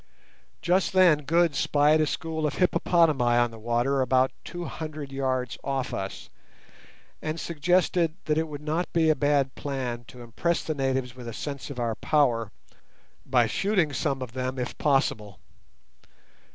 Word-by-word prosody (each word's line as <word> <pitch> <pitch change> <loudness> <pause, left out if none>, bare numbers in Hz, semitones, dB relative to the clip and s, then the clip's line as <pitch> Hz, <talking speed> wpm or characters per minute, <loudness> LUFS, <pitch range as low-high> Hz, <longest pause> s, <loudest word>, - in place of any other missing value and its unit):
Just 180 +2 +2
then 170 -6 +5
Good 170 +1 +3
spied 150 +3 +3
a 155 - +2
school 160 0 -2
of 145 - -4
hippopotami 165 -6 +3
on 120 -1 +2
the 115 - -11
water 120 +4 +1
about 130 0 +3
two 175 -1 -6
hundred 155 -3 -6
yards 130 -3 -2
off 135 -2 -2
us, 95 0 -5 0.9
and 155 +1 -3
suggested 170 +1 +1
that 150 - +1
it 160 - -1
would 150 -1 -8
not 160 +4 -2
be 160 -2 +4
a - - +2
bad 140 -2 +1
plan 125 -4 -4
to 125 -1 -11
impress 165 +9 -1
the 155 - -2
natives 130 -3 -1
with 125 -2 -9
a 115 - -5
sense 140 +4 -6
of 135 -3 -6
our 115 -1 0
power 115 -4 +1 0.8
by 125 -2 +4
shooting 180 - +1
some 135 0 -1
of 125 - -8
them 130 +1 -3
if 125 -1 -3
possible. 110 - 0
140 Hz, 160 wpm, -26 LUFS, 125-160 Hz, 0.9 s, then